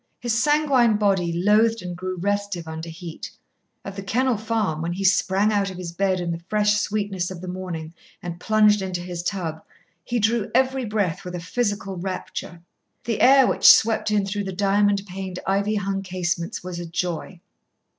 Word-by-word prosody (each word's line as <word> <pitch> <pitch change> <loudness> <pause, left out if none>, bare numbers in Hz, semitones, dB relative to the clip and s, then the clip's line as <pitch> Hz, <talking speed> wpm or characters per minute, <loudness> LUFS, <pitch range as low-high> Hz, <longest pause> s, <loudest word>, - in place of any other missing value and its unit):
His 240 -2 -1
sanguine 280 -7 +3
body 195 -5 +1
loathed 210 +5 +3
and 175 -1 -5
grew 185 +1 -4
restive 200 -2 -2
under 160 +1 -6
heat. 165 0 -8 0.6
At 195 - -6
The 195 - -5
Kennel 245 +5 +1
Farm, 215 -7 -1
when 170 +1 -2
he 195 +2 -4
sprang 195 +2 +3
out 200 -1 +1
of 185 - -8
his 180 -2 -6
bed 185 +1 0
in 175 -1 -2
the 165 0 -4
fresh 210 -1 +3
sweetness 200 -4 -2
of 185 -2 -7
the 185 - -8
morning 180 -3 -5 0.3
and 175 -1 -7
plunged 210 0 +4
into 185 -2 -3
his 175 -1 -5
tub, 170 -4 -3 0.4
he 240 - -2
drew 220 -1 +1
every 260 0 +2
breath 200 -4 -1
with 180 -1 -6
a - - -4
physical 200 +1 -2
rapture. 175 -2 -6 0.4
The 230 -2 -2
air 270 0 +7
which - - +7
swept 220 -1 +3
in 210 -2 +1
through 200 +1 -3
the 190 - -3
diamond 200 +1 +2
paned, 190 -1 -6
ivy 200 +2 +1
hung 195 -1 -1
casements 180 -3 -3
was 180 -1 -6
a 175 - -6
joy. 175 +1 -3
195 Hz, 185 wpm, -23 LUFS, 175-210 Hz, 0.6 s, air